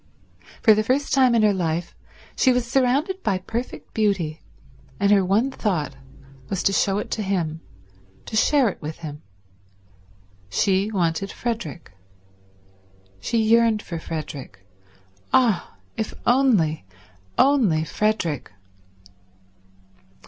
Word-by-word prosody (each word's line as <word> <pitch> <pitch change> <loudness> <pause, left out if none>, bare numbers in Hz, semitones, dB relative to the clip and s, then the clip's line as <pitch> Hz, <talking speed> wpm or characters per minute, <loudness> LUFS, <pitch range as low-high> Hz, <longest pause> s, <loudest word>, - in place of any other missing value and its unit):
For 220 - +8
the 215 - +2
first 260 +6 0
time 255 -3 +4
in 225 - +3
her 210 -1 +4
life 170 -2 -2 0.4
she 260 - +4
was 250 -1 +1
surrounded 270 +9 +1
by 195 - 0
perfect 225 +7 -6
beauty, 190 -8 0 0.6
and 200 0 +3
her 200 -2 +5
one 210 +9 +1
thought 170 - -2 0.5
was 190 - -2
to 195 - +2
show 195 0 +2
it - - -4
to 220 - -1
him, 170 -5 -2 0.6
to - - -6
share 270 +3 +4
it - - -9
with 155 +1 -6
him. 150 -1 -7 1.3
She 195 - +1
wanted 185 -1 -1
Frederick. 195 - -5 1.3
She 230 - -1
yearned 225 -1 +3
for 170 -2 -5
Frederick. 145 - -7 0.7
Ah, 225 - +2 0.2
if 220 - -3
only, 225 - +3 0.5
only 235 - +3
Frederick 170 - -1
205 Hz, 120 wpm, -23 LUFS, 165-235 Hz, 1.3 s, For